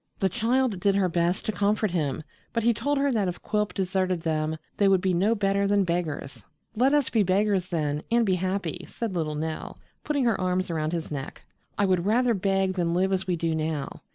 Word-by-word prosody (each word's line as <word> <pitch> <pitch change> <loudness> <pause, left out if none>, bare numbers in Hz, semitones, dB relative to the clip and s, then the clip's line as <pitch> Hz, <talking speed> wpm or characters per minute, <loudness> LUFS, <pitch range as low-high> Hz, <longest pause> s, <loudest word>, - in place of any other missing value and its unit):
The 190 - +1
child 240 -2 +1
did 200 +2 +2
her 195 -2 +3
best 175 +2 0
to - - 0
comfort 210 0 +1
him, 155 -4 -1 0.3
but 230 -1 0
he 235 +1 +4
told 285 +6 -1
her 280 0 +2
that 210 -6 +1
if 175 - -4
Quilp 210 -1 0
deserted 185 -2 -1
them 155 -1 -1 0.2
they 200 - +4
would 195 -1 +5
be 185 0 0
no 200 +6 +2
better 200 -1 +1
than 200 0 +3
beggars. 170 -5 -3 0.3
"Let 255 +5 +3
us 295 -2 +2
be 225 - +3
beggars 190 -1 +1
then, 150 -3 -1
and 235 0 +3
be 190 - +2
happy," 185 -1 -2
said 230 -4 -4
little 155 -3 -2
Nell, 155 +1 -4 0.3
putting 285 -3 0
her 230 -5 +1
arms 185 0 0
around 155 -1 -1
his 165 -2 -4
neck. 135 -2 -6 0.3
"I 205 - +3
would 185 -2 +2
rather 240 +2 +3
beg 195 -1 +1
than 170 -2 0
live 190 +2 +2
as 190 0 -1
we 180 - +1
do 165 -1 -1
now. 155 -2 -3
190 Hz, 215 wpm, -26 LUFS, 170-210 Hz, 0.3 s, would